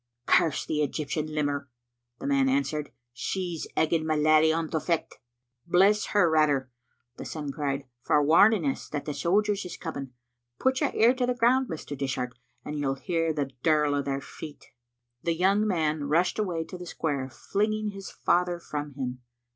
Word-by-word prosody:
"Curse 160 -3 +3
the 150 - -1
Eg)rptian 150 +1 -2
limmer," 145 -2 -1 0.5
the - - -7
man 275 -1 +3
answered, 155 - -1 0.2
"she's 175 +5 -3
egging 160 0 +2
my 155 0 0
laddie 155 +1 +5
on 165 0 0
to 160 - +1
fecht." 165 +1 -2 0.5
"Bless 195 +5 +4
her 205 -4 +3
rather," 145 -5 +2 0.5
the - - -6
son 150 -3 -5
cried, 140 -1 -2 0.2
"for 150 - +3
warning 170 +5 +5
us 135 - -2
that 145 -1 -4
the 150 - -3
sojers 205 +5 +1
is 180 -2 -7
coming. 140 -6 -6 0.5
Put 260 +2 +1
your 290 - +3
ear 235 +3 +5
to 255 -1 -1
the 250 - 0
ground, 250 +2 +3
Mr. 155 -2 -5
Dishart, 130 -2 -2 0.3
and 150 0 -4
you'll 135 -2 0
hear 165 +2 -1
the 145 -3 -2
dirl 150 -2 +3
o' 145 - +1
their 140 0 -2
feet." 150 +2 -10 0.5
The 170 -1 0
young 195 +5 +3
man 155 -6 0
rushed 170 +8 +2
away 175 -6 -1
to 180 +2 -9
the 180 - -8
square, 140 -5 -2
flinging 215 - -1
his 195 -1 -8
father 175 0 +1
from 145 -4 -5
him. 125 -2 -4
160 Hz, 175 wpm, -27 LUFS, 145-195 Hz, 0.5 s, laddie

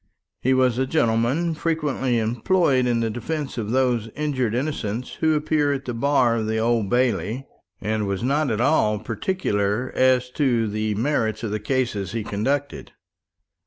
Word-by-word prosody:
He 130 +1 +2
was 130 -2 +2
a 130 - +1
gentleman 130 +5 +1
frequently 150 -6 -1
employed 125 +4 +2
in 120 -1 +1
the 115 -1 0
defence 135 +3 -4
of 105 -2 -3
those 125 -3 +1
injured 130 -7 -1
innocents 125 -4 -3
who 160 -1 +3
appear 150 -1 +1
at 135 -1 -3
the 125 - -3
bar 125 -1 +2
of 110 -1 -2
the 110 0 0
Old 115 -2 +1
Bailey; 125 +1 0 0.4
and 110 -1 -1
was 100 +2 -2
not 140 +3 +1
at 110 -2 -1
all 120 -5 +3
particular 110 - -1
as 130 -1 +3
to 125 -6 +1
the 105 0 -2
merits 110 -3 0
of 110 - -2
the 105 - -1
cases 105 -5 -1
he 115 -2 -2
conducted. 135 +8 -2
125 Hz, 160 wpm, -23 LUFS, 110-140 Hz, 0.4 s, who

